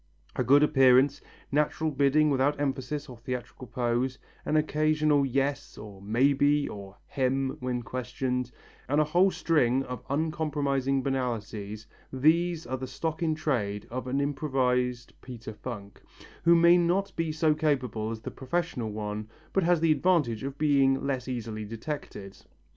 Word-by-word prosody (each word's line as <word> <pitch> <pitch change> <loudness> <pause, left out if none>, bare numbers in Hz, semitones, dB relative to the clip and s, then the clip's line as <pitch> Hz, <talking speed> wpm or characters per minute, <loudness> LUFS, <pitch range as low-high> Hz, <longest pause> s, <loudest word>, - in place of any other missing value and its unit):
A - - 0
good 140 +4 +5
appearance, 135 0 +4 0.3
natural 150 +2 +1
bidding 145 +2 +3
without 140 +2 +1
emphasis 145 +1 -2
or 125 -3 -10
theatrical 125 +1 -6
pose, 125 +3 -1 0.3
an 155 - +1
occasional 155 -2 +2
"yes" 135 +2 -2
or 105 -2 -10
"may 120 +8 +2
be" 145 +1 +2
or 100 -1 -9
"hem" 135 0 -1
when 125 -1 -3
questioned, 125 +1 -3 0.4
and 145 +2 +2
a - - +5
whole 175 +6 +3
string 135 -8 +1
of 125 -1 -6
uncompromising 140 -3 0
banalities, 110 -5 -3 0.3
these 165 +5 +2
are 130 +2 -3
the 130 0 -6
stock 160 +6 -4
in 160 -2 +1
trade 110 -10 -2
of 130 +1 -4
an 135 +2 0
improvised 125 -4 0
Peter 120 -3 -8
Funk, 105 -3 -8 0.4
who 170 0 +7
may 170 +1 +6
not 190 +3 0
be 165 -1 -1
so 155 0 +2
capable 130 -8 -1
as 115 -1 -5
the - - -6
professional 130 -4 -3
one 105 0 -5 0.2
but 195 - +3
has 175 -2 +2
the 165 -1 +4
advantage 150 -10 +2
of 135 0 -5
being 140 -3 +3
less 130 -3 -2
easily 115 -4 -4
detected. 110 -3 -7
135 Hz, 150 wpm, -28 LUFS, 125-150 Hz, 0.4 s, who